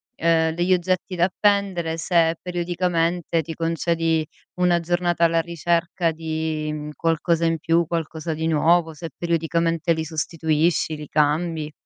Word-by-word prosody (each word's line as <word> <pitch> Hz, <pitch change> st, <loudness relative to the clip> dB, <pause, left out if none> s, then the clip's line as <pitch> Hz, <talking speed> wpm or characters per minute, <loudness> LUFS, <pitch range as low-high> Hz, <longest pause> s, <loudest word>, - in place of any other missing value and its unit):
ehm, 160 Hz, -2 st, +2 dB
degli 175 Hz, +2 st, +2 dB
oggetti 185 Hz, +1 st, -1 dB
da 175 Hz, -, +1 dB
appendere 190 Hz, -4 st, 0 dB
se 165 Hz, -1 st, +2 dB
periodicamente 175 Hz, -1 st, -1 dB
ti 160 Hz, +1 st, -7 dB
concedi 165 Hz, -1 st, 0 dB, 0.3 s
una 180 Hz, -1 st, +2 dB
giornata 175 Hz, 0 st, 0 dB
alla 165 Hz, 0 st, +4 dB
ricerca 170 Hz, +1 st, 0 dB
di 160 Hz, -1 st, -3 dB
mhmm 150 Hz, 0 st, -5 dB
qualcosa 165 Hz, 0 st, +1 dB
in 165 Hz, 0 st, +1 dB
più, 165 Hz, +1 st, +1 dB
qualcosa 160 Hz, -1 st, -3 dB
di 160 Hz, +1 st, -2 dB
nuovo, 165 Hz, +1 st, +3 dB
se 165 Hz, +2 st, -7 dB
periodicamente 165 Hz, 0 st, 0 dB
li 160 Hz, 0 st, -2 dB
sostituisci, 160 Hz, 0 st, 0 dB
li 150 Hz, 0 st, -8 dB
cambi. 155 Hz, +1 st, 0 dB
165 Hz, 135 wpm, -23 LUFS, 160-175 Hz, 0.3 s, alla